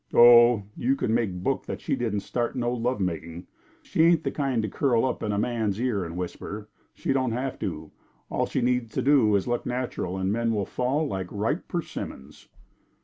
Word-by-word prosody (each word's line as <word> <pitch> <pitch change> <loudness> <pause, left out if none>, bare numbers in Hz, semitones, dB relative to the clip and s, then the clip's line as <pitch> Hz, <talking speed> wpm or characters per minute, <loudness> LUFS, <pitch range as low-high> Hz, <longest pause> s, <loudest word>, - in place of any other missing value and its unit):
"Oh, 120 -2 +8
you 130 +3 +1
can 115 -4 -1
make 115 -4 +1
book - - -1
that - - -4
she - - -1
didn't 110 -4 -1
start 120 +2 -2
no 120 -1 0
love 125 0 -1
making. 85 -1 -3 0.4
She - - 0
ain't 165 -1 +5
the - - -1
kind 135 -6 0
to - - -1
curl 120 +2 +1
up 125 - -2
in 105 - -1
a 100 - -1
man's 110 -2 -1
ear 120 -6 0
and 85 0 -6
whisper. 105 +3 -5 0.3
She - - -1
don't 130 -3 0
have 130 +2 -3
to. 80 -6 -5 0.4
All - - -1
she - - -1
needs 125 -2 0
to - - -1
do 130 -7 +4
is 100 - +1
look 120 0 -1
natural; 120 -7 -3
the 95 - -3
men 115 +4 +1
will 100 -2 0
fall 130 +9 0
like 95 -6 -3
ripe 110 - -2
persimmons." 75 - -6
115 Hz, 200 wpm, -26 LUFS, 100-125 Hz, 0.4 s, Oh